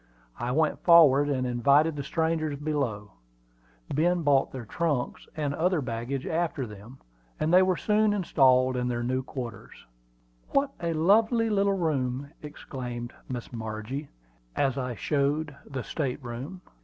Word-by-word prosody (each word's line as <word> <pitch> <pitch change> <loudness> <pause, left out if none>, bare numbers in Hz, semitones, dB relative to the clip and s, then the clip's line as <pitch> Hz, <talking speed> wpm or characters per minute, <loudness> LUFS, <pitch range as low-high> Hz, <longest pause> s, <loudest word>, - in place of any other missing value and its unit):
I 120 +1 -2
went 155 +3 +1
forward 145 -5 +6
and 130 -2 0
invited 140 +6 +3
the 145 - -3
strangers 160 -1 -1
below. 135 -9 -2 0.8
Ben 170 +3 +2
brought 140 -2 +3
their 130 -3 -7
trunks 145 0 -2
and 145 -2 -1
other 180 +3 +1
baggage 125 +1 -4
after 160 -5 -1
them, 105 +4 -11 0.4
and 155 +2 0
they 185 - +8
were 185 -2 +2
soon 215 0 +2
installed 130 -9 +3
in 125 0 -1
their 120 -1 -2
new 130 +2 0
quarters. 125 -5 -8 0.7
"What 275 0 +2
a 170 -1 -1
lovely 220 +7 +3
little 200 -1 +2
room!" 140 -5 -1
exclaimed 125 -5 -7 0.2
Miss 125 -1 -6
Margie, 110 +5 -5 0.5
as 135 -3 +1
I 125 -3 -3
showed 145 +4 -1
the 135 -3 -5
state 140 -3 -3
room. 130 +10 -7
140 Hz, 145 wpm, -27 LUFS, 125-165 Hz, 0.8 s, they